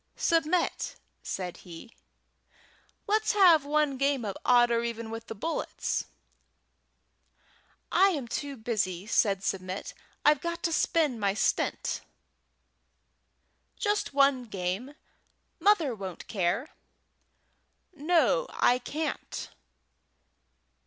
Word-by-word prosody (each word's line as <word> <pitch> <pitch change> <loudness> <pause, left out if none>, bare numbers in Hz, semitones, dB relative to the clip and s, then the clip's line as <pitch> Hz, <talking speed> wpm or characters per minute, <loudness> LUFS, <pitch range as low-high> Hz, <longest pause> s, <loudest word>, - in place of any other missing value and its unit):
"Submit," 335 +1 +1 0.3
said 180 -2 -5
he, 175 +6 -12 1.1
"let's 435 +1 +1
have 355 -7 +6
one 295 -2 +1
game 275 -3 +1
of 200 - -3
odd 240 -1 +5
or 230 0 +1
even 230 -1 -4
with 225 0 -7
the - - -6
bullets." 325 +11 -2 1.9
"I 390 +1 +5
am 290 -10 -3
too 280 +3 -4
busy," 200 -5 -2
said 200 -3 +2
Submit. 185 0 -3 0.3
"I've 300 -1 +5
got 340 0 -4
to 330 - 0
spin 310 -8 +1
my 200 -1 +1
stint." - - 0 1.8
"Just 415 -1 0
one 275 -2 +3
game. 200 +7 -4 0.6
Mother 345 -10 +3
won't 190 -5 -7
care." 200 - -1 1.2
"No; 345 - +2
I 250 +1 +2
can't." 305 +5 -4
255 Hz, 100 wpm, -28 LUFS, 210-320 Hz, 1.9 s, have